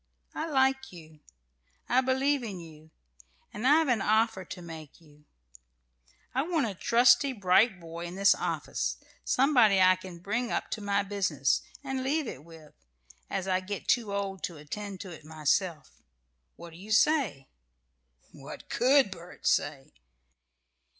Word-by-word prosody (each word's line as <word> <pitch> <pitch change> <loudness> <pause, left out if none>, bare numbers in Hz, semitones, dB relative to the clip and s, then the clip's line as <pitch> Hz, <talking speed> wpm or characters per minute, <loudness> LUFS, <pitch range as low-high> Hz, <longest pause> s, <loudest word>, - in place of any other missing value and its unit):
I 320 +1 -4
like 265 -1 +1
you; 160 -3 -14 0.7
I 255 +2 +3
believe 265 +2 +1
in 205 -6 -6
you; 160 -2 -13 0.6
and 220 +5 -2
I've 310 +2 +5
an 240 -5 +1
offer 220 -1 +1
to 180 - -9
make 160 -4 -10
to 165 - -22
you: 150 0 -22 1.1
I 260 - +1
want 320 -2 0
a 210 - -3
trusty, 245 - +4
bright 200 0 +3
boy 170 0 -8
in 175 - -8
this 195 +1 +5
office, - - -3 0.3
somebody 245 -7 +4
I 185 0 +6
can 185 -1 -10
bring 230 +7 -3
up - - -2
to 215 - -3
my 200 0 0
business, 190 -9 0 0.2
and 265 -1 -3
leave 295 +3 0
it 145 - -8
with, 160 -2 -15 0.6
as 190 0 -3
I 185 -1 +2
get 195 +1 -6
too 230 -4 +1
old 195 -1 -3
to 170 - -8
attend 195 +6 -7
to 190 - -8
it 160 - -11
myself. 155 +2 -2 0.5
What 170 - -11
do 165 - -13
you 205 +4 -10
say?" 215 - +2 0.8
What - - -11
could 260 -3 +3
Bert 175 -1 -11
say? 145 -2 0
200 Hz, 155 wpm, -29 LUFS, 170-250 Hz, 1.1 s, I